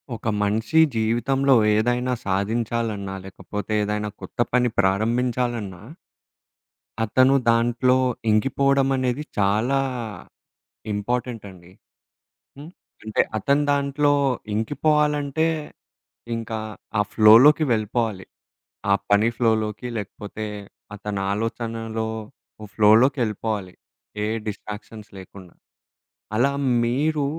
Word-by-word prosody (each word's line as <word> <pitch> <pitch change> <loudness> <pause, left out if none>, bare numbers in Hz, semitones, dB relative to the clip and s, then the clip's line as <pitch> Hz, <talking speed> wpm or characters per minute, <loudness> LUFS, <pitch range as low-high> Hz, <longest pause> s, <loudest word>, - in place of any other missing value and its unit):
ఒక 110 - -7
మనిషి 110 +10 +1 0.2
జీవితంలో 125 +5 +2 0.2
ఏదైనా 120 +3 +1
సాధించాలన్నా, 105 0 -2
లేకపోతే 105 +2 -7
ఏదైనా 105 0 -2
కొత్త - - -11
పని 125 0 +3
ప్రారంభించాలన్నా 115 0 0 1.2
అతను 130 +5 +4
దాంట్లో 120 +2 +3 0.3
ఇంకిపోవడం 135 +5 +2
అనేది 130 +2 -1
చాలా, 110 +7 +2 1.1
ఇంపార్టెంట్ 120 +3 -3
అండి. 90 -1 -16 0.9
హ్మ్. 150 +4 -10 0.3
అంటే 110 0 +1 0.2
అతను 140 +7 +1
దాంట్లో 145 +1 +2 0.4
ఇంకిపోవాలంటే, 150 +5 +1 0.9
ఇంకా 115 -1 -4 0.4
ఆ - - +4
ఫ్లోలోకి 120 +9 +7
వెళ్ళిపోవాలి. 110 -3 -1 0.7
ఆ - - +6 0.2
పని 105 +3 +4
ఫ్లోలోకి, 110 0 0
లేకపోతే 105 +1 -6 0.5
అతని 105 -1 -4
ఆలోచనల్లో, 115 +1 -3 0.7
ఫ్లోలోకెళ్ళిపోవాలి. 110 -3 +2 0.5
ఏ - - 0 0.2
డిస్ట్రాక్షన్స్ 105 +1 -8
లేకుండా. 95 -1 -12 0.8
అలా 135 +4 +3 0.3
మీరు, 145 +5 0
115 Hz, 85 wpm, -23 LUFS, 105-130 Hz, 1.2 s, ఫ్లోలోకి